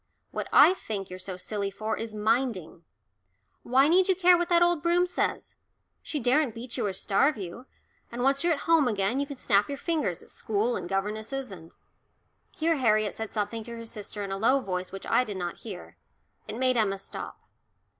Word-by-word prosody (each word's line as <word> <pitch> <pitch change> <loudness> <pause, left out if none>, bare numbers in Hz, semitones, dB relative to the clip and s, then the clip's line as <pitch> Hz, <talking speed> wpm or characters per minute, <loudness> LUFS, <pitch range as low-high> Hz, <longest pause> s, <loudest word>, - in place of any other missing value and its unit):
What - - -4
I 365 - +8
think 200 - -6
you're 185 - -7
so 185 0 -6
silly 200 +1 -3
for 215 +3 -3
is 225 -1 -5
minding 215 -7 -1 0.8
why 265 +3 +4
need 360 +3 +4
you 380 - +3
care 360 0 +6
what 345 0 -1
that 345 0 +5
old 345 -3 +2
Broom 345 +2 +3
says? 360 - -2 0.4
She 300 - -4
daren't 255 0 +2
beat 230 +1 -6
you 235 -5 -1
or 195 - -2
starve 215 +10 +2
you, 200 +7 -8 0.4
and 240 +1 -3
once 275 +2 +2
you're 340 -1 +3
at 285 - -4
home 330 -5 +4
again 210 +3 0
you 280 - -1
can 280 - -7
snap 205 -4 +2
your 280 - -3
fingers 300 - -2
at - - -10
school 220 +3 -1
and 175 - -5
governesses 215 +6 -3
and 165 -3 -12 0.4
" - - -45
Here 325 0 +2
Harriet 215 -5 +2
said 220 -1 -6
something 215 +1 -3
to 235 - -7
her 230 0 -8
sister 210 -2 -6
in 195 - -5
a 195 - -2
low 255 +6 +4
voice 185 -6 -4
which 195 - -8
I - - +3
did 205 -5 -6
not 175 -2 -4
hear. 195 -6 -9 0.5
It 215 +1 -5
made 255 0 +2
Emma 200 -3 +1
stop. 195 - -8
230 Hz, 205 wpm, -27 LUFS, 200-275 Hz, 0.8 s, I